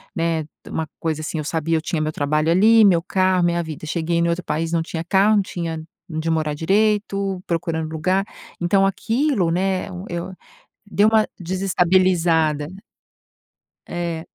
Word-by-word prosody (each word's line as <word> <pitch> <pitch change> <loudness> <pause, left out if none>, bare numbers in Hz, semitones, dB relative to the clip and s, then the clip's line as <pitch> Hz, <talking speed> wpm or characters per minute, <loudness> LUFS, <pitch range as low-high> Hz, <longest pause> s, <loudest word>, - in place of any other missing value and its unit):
né, 165 -1 0
de 150 - -16
uma 160 -1 -2
coisa 155 -2 -2
assim, 155 +1 -4
eu 155 - -2
sabia, 160 +2 0
eu 160 - -2
tinha 160 0 -2
meu 155 0 -1
trabalho 150 +2 0
ali, 220 +6 +6
meu 185 -5 +5
carro, 185 -1 +2
minha 170 0 +1
vida. 155 -2 -7
Cheguei 170 +1 -1
em 170 0 +2
outro 170 +1 -1
país, 160 +2 -2
não 165 -1 +1
tinha 165 0 -4
carro, 195 +4 +3
não 200 - +3
tinha 165 -3 -4 0.3
onde 160 +1 -2
morar 155 -2 0
direito, 195 +1 0
procurando 160 -2 -2
lugar. 185 +5 0 0.3
Então 195 +3 +3
aquilo, 225 - 0
né, 185 +2 0 0.2
e - - -6
eu 180 +2 -5 0.5
deu 205 +1 +3
uma 220 -1 +3
desestabilizada. 175 -4 +2 1.2
É. 170 -1 -4
170 Hz, 165 wpm, -21 LUFS, 160-190 Hz, 1.2 s, ali